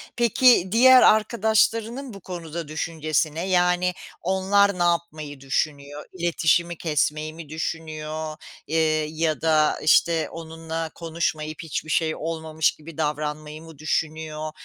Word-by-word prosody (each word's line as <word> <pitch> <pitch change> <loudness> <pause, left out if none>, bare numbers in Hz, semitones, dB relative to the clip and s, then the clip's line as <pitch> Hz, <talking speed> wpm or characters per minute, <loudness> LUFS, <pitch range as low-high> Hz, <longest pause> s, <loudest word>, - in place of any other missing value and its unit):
Peki 235 -4 +4
diğer 255 +2 +7
arkadaşlarının 225 +3 +2
bu 195 - -10
konuda 170 -3 -6
düşüncesi 155 -1 -1
ne? 170 +3 -3
Yani 180 0 +2 0.3
onlar 190 +1 +2
ne 175 - +3
yapmayı 155 -4 -2
düşünüyor? 145 +1 -3
İletişimi 170 -1 +1
kesmeyi 155 -1 -1
mi 160 -3 -11
düşünüyor? 155 -1 -5 0.3
Eee, 155 -1 +1
ya 160 0 -1
da, 155 -2 +2
işte, 160 0 +3
onunla 165 0 -6
konuşmayıp 160 -2 -3
hiçbir 155 0 -4
şey 160 0 +1
olmamış 160 -1 -1
gibi 155 0 -13
davranmayı 150 0 -3
mı 160 -3 -13
düşünüyor? 155 0 -3
160 Hz, 120 wpm, -24 LUFS, 155-175 Hz, 0.3 s, diğer